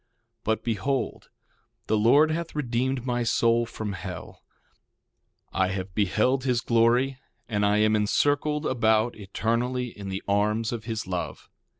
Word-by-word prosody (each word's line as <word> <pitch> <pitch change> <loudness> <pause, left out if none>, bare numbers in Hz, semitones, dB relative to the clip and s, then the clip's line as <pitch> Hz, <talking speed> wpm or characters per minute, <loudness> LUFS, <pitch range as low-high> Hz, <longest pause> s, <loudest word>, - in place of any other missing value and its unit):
1:15 120 - -48 0.4
But 110 0 0
behold, 125 +4 -2 0.6
the 110 - +1
Lord 140 +9 +5
hath 165 0 -3
redeemed 130 -1 -1
my 120 -1 0
soul 115 0 +2
from 110 -3 -5
hell; 90 -2 -8 1.1
I 95 - +2
have 95 0 -4
beheld 110 +7 +1
his 125 -3 +1
glory, 120 +4 +2 0.3
and 105 -2 -1
I 105 +1 +3
am 110 0 +3
encircled 145 +8 +1
about 110 -2 +2
eternally 120 +5 -1
in 100 -1 -7
the 95 0 -4
arms 105 +2 +1
of 115 -2 -5
his 110 -3 -3
love. 90 -1 -5
115 Hz, 140 wpm, -26 LUFS, 105-125 Hz, 1.1 s, Lord